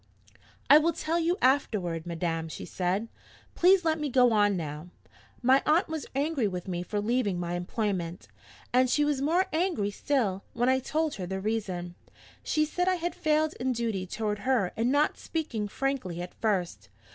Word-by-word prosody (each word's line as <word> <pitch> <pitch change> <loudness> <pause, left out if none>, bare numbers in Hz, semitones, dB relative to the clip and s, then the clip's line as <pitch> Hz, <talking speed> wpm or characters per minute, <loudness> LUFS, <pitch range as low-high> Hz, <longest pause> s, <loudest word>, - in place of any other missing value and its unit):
'I 295 - +9
will 330 +2 +1
tell 325 +2 -1
you 340 +2 +1
afterward, 190 - +1
madam,' 165 -1 -2
she - - -7
said. 185 +5 -1 0.5
'Please 365 0 +4
let 320 -1 +1
me 300 -1 -2
go 250 -1 +4
on 205 -2 +3
now. 155 +1 -6 0.5
My 260 +2 +5
aunt 320 +4 +2
was 315 -2 -4
angry 280 -4 +1
with 180 -1 -5
me 175 -2 -2
for 205 +3 -3
leaving 210 -4 0
my 175 0 -3
employment 180 -1 -3 0.5
and 255 0 +4
she 295 +3 +3
was 290 -2 0
more 340 +6 +2
angry 315 - 0
still, 205 -5 -1
when 240 +2 +1
I 260 0 +3
told 310 +3 -1
her 180 - -4
the 190 +1 -3
reason. 190 -5 -3 0.5
She 305 0 +1
said 360 +4 -1
I 370 - +3
had 345 -1 -3
failed 310 0 +1
in 255 +1 0
duty 225 -6 -2
toward 210 +1 -2
her 220 -4 +1
in 230 +2 +1
not 290 +3 +2
speaking 250 -10 -3
frankly 250 -8 -2
at 180 0 -6
first. 175 - -2
230 Hz, 180 wpm, -28 LUFS, 185-300 Hz, 0.5 s, I